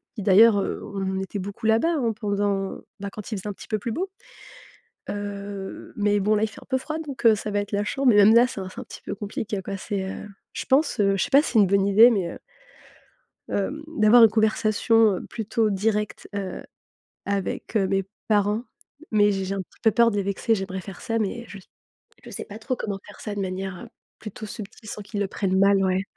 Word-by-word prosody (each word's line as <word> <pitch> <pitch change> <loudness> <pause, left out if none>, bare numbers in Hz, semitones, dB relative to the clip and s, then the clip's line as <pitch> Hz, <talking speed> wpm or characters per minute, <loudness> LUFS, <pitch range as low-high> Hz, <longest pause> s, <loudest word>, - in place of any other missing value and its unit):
qui 215 - -5
d'ailleurs, 205 +2 +6
heu, - - -3
on 190 -1 -3
était 190 +2 -5
beaucoup 200 +3 -7
là-bas, 230 +10 +3
hein, 235 -5 0
pendant, 200 -2 -1 0.2
bah, 200 0 -4
quand 210 0 -8
il 215 - -2
faisait 190 - -7
un - - -4
petit - - -13
peu 215 - 0
plus 230 +4 -4
beau, 370 - -2 1.0
heu, 200 -1 -6
mais 205 0 +2
bon, 210 +2 +2
là, 210 - +1
il - - +2
fait 205 - -13
un - - -15
peu 260 - +2
froid 310 +4 -4
donc 290 -5 -7
heu, 220 - +7
ça 210 +1 -5
va 205 - +1
être 205 0 -4
la 205 0 +1
chambre. 270 +6 -1
Mais 225 - +5
même 205 +1 +7
là, 240 +2 +7
c'est 215 - -6
un 185 - -6
c'est 230 - -10
un - - -7
petit - - -11
peu - - -4
compliqué 205 0 -4
quoi. 195 - -4
C'est, 195 0 -3
heu, - - -7 0.3
je - - -5
pense, 270 -2 +2
heu, 195 -1 +3
je - - +1
sais - - -4
pas 280 +1 +7
si - - -3
c'est 225 - +5
une 200 - +5
bonne 195 +1 +3
idée, 215 +4 +8
mais, 185 -6 -1
heu - - -11 1.1
hem, 270 +10 -2
d'avoir 240 -6 +5
une 225 - +6
conversation 220 -1 +3
plutôt 225 0 -1
directe, 210 +1 -1
heu, 195 -2 -4 0.6
avec, 200 +2 -3
heu, 195 -3 +3
mes 195 0 +1 0.2
parents 210 +2 +2 0.5
mais 205 -1 +4
j'ai 195 -1 -2
j'ai 190 +1 -3
un - - -3
petit - - -24
peu 225 - +5
peur 235 +1 +4
de 205 - -3
les 200 - +1
vexer. 200 +4 0
J'aimerais 190 -2 -4
faire 190 0 -10
ça, 230 0 -1
mais 225 +3 -2
je 205 - -9 0.7
je - - -10
sais - - -6
pas 210 0 -10
trop 255 +4 -2
comment 205 -4 -4
faire - - -13
ça 210 - -5
de 205 - -3
manière, 190 -1 -4
heu, - - -13 0.3
plutôt 215 0 -8
subtile 215 +1 -9
sans 210 - -6
qu'ils 205 +1 -5
le 200 - 0
prennent 190 -1 0
mal, 200 +1 +5
ouais. 185 0 +1
205 Hz, 240 wpm, -24 LUFS, 195-225 Hz, 1.1 s, idée